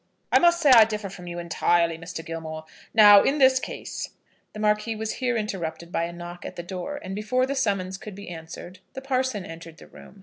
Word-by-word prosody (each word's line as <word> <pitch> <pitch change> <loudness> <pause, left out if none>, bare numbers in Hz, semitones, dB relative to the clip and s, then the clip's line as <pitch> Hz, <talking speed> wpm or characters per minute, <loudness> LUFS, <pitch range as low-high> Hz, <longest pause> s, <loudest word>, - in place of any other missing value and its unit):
"I - - +6
must 345 0 +4
say 295 -5 +4
I 230 -3 +10
differ 215 -2 -4
from 180 -1 -10
you 175 0 -6
entirely, 170 0 +1
Mr. 165 0 -8
Gilmore. 160 -1 -6 0.3
Now, 205 -2 +8
in 285 - +1
this 260 -2 +5
case - - -6 0.2
" - - -40
The 215 - -8
Marquis 210 +1 +1
was 220 0 -3
here 250 -2 +1
interrupted 175 -5 -4
by 165 - 0
a 170 - -6
knock 175 0 -9
at - - -7
the 175 - -6
door, 190 +11 -5
and, 185 - -6
before 235 +6 0
the 275 - -2
summons 195 -7 -1
could 210 -3 -9
be 200 +1 -10
answered, 175 +2 -9
the 265 - -7
parson 260 -7 -1
entered 165 0 -10
the - - -14
room. 200 - -15
195 Hz, 225 wpm, -25 LUFS, 170-230 Hz, 0.3 s, I